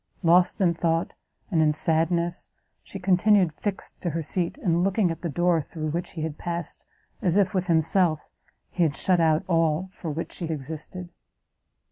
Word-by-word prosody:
Lost 175 +2 +4
in 175 -3 +4
thought 165 0 -1 0.4
and 165 -3 +3
in 150 -1 +3
sadness, 170 +2 +1 0.3
she - - -9
continued 190 -1 +3
fixed 200 +4 -5
to 175 - -1
her 165 +1 -3
seat; 175 - -1
and 175 - +1
looking 195 -1 +2
at 165 0 -7
the 170 - -3
door 175 +1 +2
through 155 +1 -5
which 175 +3 -4
he 160 - -4
had 155 -1 -5
passed, 170 -2 -5 0.4
as 185 -3 +1
if, 195 -2 +2
with 185 -1 -1
himself, 165 -1 +1 0.4
he 180 - -3
had 155 -4 +2
shut 180 +3 +2
out 160 0 +3
all 165 +1 +1
for 175 -3 -7
which 160 +3 -4
she 175 - -5
existed. 160 +4 -6
170 Hz, 175 wpm, -25 LUFS, 160-180 Hz, 0.4 s, Lost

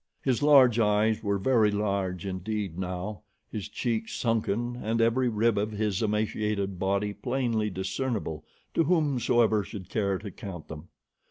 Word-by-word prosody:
His 130 -1 +1
large 135 -5 +6
eyes 105 0 +2
were 100 -2 0
very 110 +1 +3
large 100 -3 -1
indeed 95 -1 -3
now, 90 +1 -4 0.3
his 105 -2 -5
cheeks 110 0 -2
sunken, 115 +1 0
and 115 -1 -1
every 120 +2 +3
rib 110 -1 +2
of 105 +1 0
his 105 -3 -1
emaciated 105 -3 -1
body 100 +2 0
plainly 120 -3 -1
discernible 95 - -3 0.3
to 165 - +2
whomsoever 125 - +2
should 95 -2 -9
care 100 -3 0
to 100 +1 -8
count 95 -5 -8
them. 80 +2 -8
105 Hz, 145 wpm, -28 LUFS, 100-115 Hz, 0.3 s, large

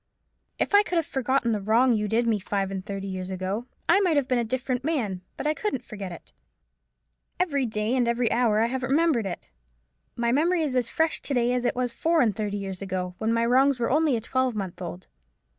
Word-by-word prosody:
If - - -1
I 405 - +8
could 390 -4 -3
have 330 -2 +2
forgotten 260 -2 0
the 210 -2 -1
wrong 235 +5 +3
you 210 -1 0
did 225 +3 +1
me 225 -3 +1
five 195 0 -2
and 190 -1 -4
thirty 195 0 -5
years 185 -1 -5
ago, 190 +5 -3 0.2
I 355 +4 +5
might 355 -6 +2
have 280 -3 +1
been 255 -2 +2
a - - +1
different 255 +2 -2
man: 235 - -1 0.2
but - - -5
I 300 - +2
couldn't 300 - -3
forget 200 -4 -7
it. 170 - -12 1.1
Every 285 -8 +1
day 215 +2 -1
and 245 -2 +2
every 235 -1 +1
hour 230 -3 +3
I - - +4
have 255 +2 -2
remembered 270 -4 +2
it. 175 - -7 0.6
My 235 0 0
memory 330 +5 +2
is 280 -4 -1
as 245 -2 +1
fresh 320 0 0
to 280 - -2
day 245 0 +2
as 250 0 -1
it - - +1
was 250 -1 -1
four 330 +6 +1
and 220 -8 +3
thirty 205 -1 -2
years 195 -2 -5
ago, 185 -2 -3
when 220 +1 0
my 230 0 +2
wrongs 265 +3 +4
were 235 0 -1
only 300 -3 +3
a - - -4
twelvemonth 225 -7 -2
old." 180 +1 -6
235 Hz, 225 wpm, -26 LUFS, 205-270 Hz, 1.1 s, I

